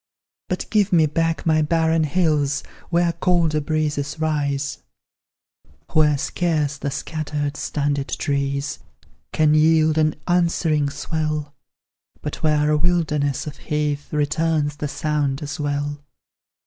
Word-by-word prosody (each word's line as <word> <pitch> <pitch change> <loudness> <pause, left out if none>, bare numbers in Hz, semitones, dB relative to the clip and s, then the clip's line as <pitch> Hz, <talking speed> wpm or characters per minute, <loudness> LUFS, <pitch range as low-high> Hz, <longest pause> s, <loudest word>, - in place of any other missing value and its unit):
But - - -2
give 205 -2 +3
me 165 -3 +5
back 165 +2 -1
my 155 -1 +3
barren 160 +1 +2
hills 150 -3 +1 0.3
Where 170 0 +2
colder 170 -3 +2
breezes 150 -1 -1
rise; 145 -3 -1 1.1
Where 150 -2 +4
scarce 150 -1 -1
the 140 - -2
scattered, 150 0 -3
stunted 145 -2 -1
trees 140 0 -1 0.5
Can 155 -1 +3
yield 155 0 +4
an 155 0 +2
answering 170 -4 +2
swell, 155 -1 -3 0.7
But 150 - -6
where 150 -2 +2
a 150 - +3
wilderness 150 -4 0
of 150 - -7
heath 150 -1 -2
Returns 150 0 0
the 150 - -2
sound 145 -1 -1
as 145 +1 -5
well. 145 0 -2
150 Hz, 120 wpm, -22 LUFS, 145-160 Hz, 1.1 s, me